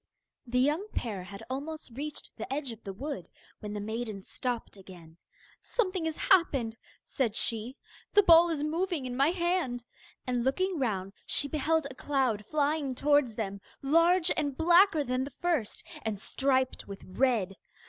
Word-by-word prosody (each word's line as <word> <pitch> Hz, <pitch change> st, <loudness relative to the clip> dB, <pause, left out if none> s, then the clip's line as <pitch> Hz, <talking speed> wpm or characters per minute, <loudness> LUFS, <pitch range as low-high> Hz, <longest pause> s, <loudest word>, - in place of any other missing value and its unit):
The 250 Hz, +1 st, -1 dB
young 300 Hz, +10 st, +2 dB
pair 210 Hz, -6 st, -2 dB
had 200 Hz, +3 st, -9 dB
almost 285 Hz, +3 st, -5 dB
reached 290 Hz, +5 st, -7 dB
the -, -, -7 dB
edge 275 Hz, -2 st, -2 dB
of 225 Hz, -1 st, -11 dB
the 195 Hz, -, -5 dB
wood, 250 Hz, -, -6 dB, 0.3 s
when 210 Hz, -1 st, -6 dB
the 210 Hz, -, -3 dB
maiden 215 Hz, -1 st, -4 dB
stopped 245 Hz, 0 st, -4 dB
again. 175 Hz, -4 st, -14 dB, 0.4 s
'Something 370 Hz, -7 st, -1 dB
has 320 Hz, -1 st, -2 dB
happened,' 275 Hz, -11 st, +3 dB, 0.3 s
said 235 Hz, -6 st, -1 dB
she. 230 Hz, +5 st, -2 dB, 0.4 s
'The 410 Hz, -, +8 dB
ball 340 Hz, -1 st, +8 dB
is 305 Hz, -3 st, -1 dB
moving 330 Hz, -1 st, -1 dB
in 250 Hz, -1 st, -4 dB
my 275 Hz, +4 st, +4 dB
hand,' 345 Hz, -9 st, 0 dB, 0.4 s
and 245 Hz, -2 st, 0 dB
looking 360 Hz, +7 st, 0 dB
round 195 Hz, -6 st, -1 dB
she 285 Hz, -, +3 dB
beheld 315 Hz, +1 st, +1 dB
a 280 Hz, -, -6 dB
cloud 260 Hz, -6 st, 0 dB
flying 290 Hz, -2 st, 0 dB
towards 285 Hz, -4 st, +3 dB
them, 200 Hz, -3 st, -4 dB, 0.2 s
large 335 Hz, +5 st, +4 dB
and 285 Hz, -4 st, -1 dB
blacker 345 Hz, -1 st, +5 dB
than 255 Hz, -1 st, -1 dB
the 275 Hz, -1 st, -7 dB
first, 330 Hz, -11 st, -1 dB, 0.2 s
and 220 Hz, -2 st, -2 dB
striped 260 Hz, +4 st, 0 dB
with 200 Hz, -1 st, -8 dB
red. 210 Hz, -2 st, +1 dB
265 Hz, 160 wpm, -30 LUFS, 225-315 Hz, 0.4 s, The